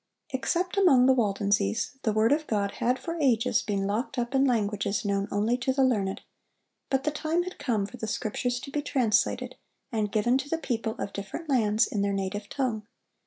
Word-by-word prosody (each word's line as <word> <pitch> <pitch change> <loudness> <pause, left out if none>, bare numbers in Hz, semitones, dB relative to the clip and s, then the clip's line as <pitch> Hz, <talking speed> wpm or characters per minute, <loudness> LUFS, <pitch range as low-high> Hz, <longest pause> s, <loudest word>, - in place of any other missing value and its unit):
Except 340 - -1
among 290 -11 +6
the 265 - +6
Waldenses, 205 - +1
the 220 - +1
word 220 +3 +3
of 310 +1 +1
God 200 -2 0
had 250 +2 +2
for 330 +6 -5
ages 250 -3 +3
been 200 -2 -1
locked 225 +7 -2
up 240 +2 -2
in 270 0 +4
languages 210 -4 0
known 200 0 0
only 215 +4 +1
to 255 +1 0
the 270 +1 +2
learned; 205 -7 +1 0.7
but 270 0 +1
the 300 - 0
time 320 +3 0
had 365 +1 -8
come 235 -8 0
for 250 - -10
the 220 - -4
Scriptures 245 +3 -2
to 275 - -8
be 295 - -1
translated, 250 -7 +1 0.3
and 215 -3 -1
given 240 +5 +2
to 280 +1 -5
the 330 - 0
people 230 -7 -2
of 200 - -4
different 200 - -6
lands 225 -4 +3
in 205 - -2
their 200 0 +1
native 195 +1 -3
tongue. 230 -6 -2
235 Hz, 200 wpm, -27 LUFS, 205-270 Hz, 0.7 s, among